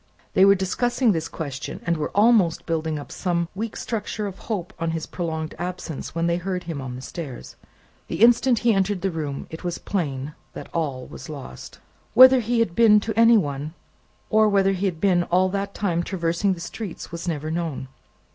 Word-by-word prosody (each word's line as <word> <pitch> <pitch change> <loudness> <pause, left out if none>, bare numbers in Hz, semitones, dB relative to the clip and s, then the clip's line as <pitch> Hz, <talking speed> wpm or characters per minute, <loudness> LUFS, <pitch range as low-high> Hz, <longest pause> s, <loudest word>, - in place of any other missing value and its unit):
They 190 - +6
were 200 0 +7
discussing 240 +6 +1
this 165 -3 -1
question, 145 -5 -6
and 170 - +1
were 155 -2 -2
almost 205 -5 +4
building 160 -1 -1
up 145 - -8
some 170 -2 -1
weak 215 +3 -4
structure 215 -1 -3
of 195 -2 -6
hope 195 -6 -4
on 165 0 -1
his 160 - -5
prolonged 160 -3 -4
absence, 175 -4 -5
when 165 0 0
they 170 0 +1
heard 180 0 -3
him 160 -5 -5
on 125 -1 -6
the 130 - -8
stairs. 140 -4 -7 0.5
The - - 0
instant 240 +1 +5
he 235 - +5
entered 195 -1 0
the 195 - 0
room, 150 -4 -4
it 160 - -8
was 175 -1 -2
plain 145 -6 -3 0.2
that - - -9
all 140 -6 -2
was 130 - -10
lost. 135 - -9 0.4
Whether 260 +2 +9
he 240 +1 0
had 230 -4 +3
really 170 - -18
been 210 0 +7
to 220 +1 -4
any 230 0 +7
one, 145 -3 -2 0.6
or 215 0 +5
whether 195 -1 +3
he 195 +1 0
had 170 -4 -3
been 185 -2 +3
all 185 +2 +2
that 200 +1 -3
time 175 -5 0
traversing 175 +1 0
the 175 - -8
streets, 175 +2 -7
was 170 +1 -6
never 155 -2 -2
known. 165 -5 -3
175 Hz, 200 wpm, -24 LUFS, 160-200 Hz, 0.6 s, Whether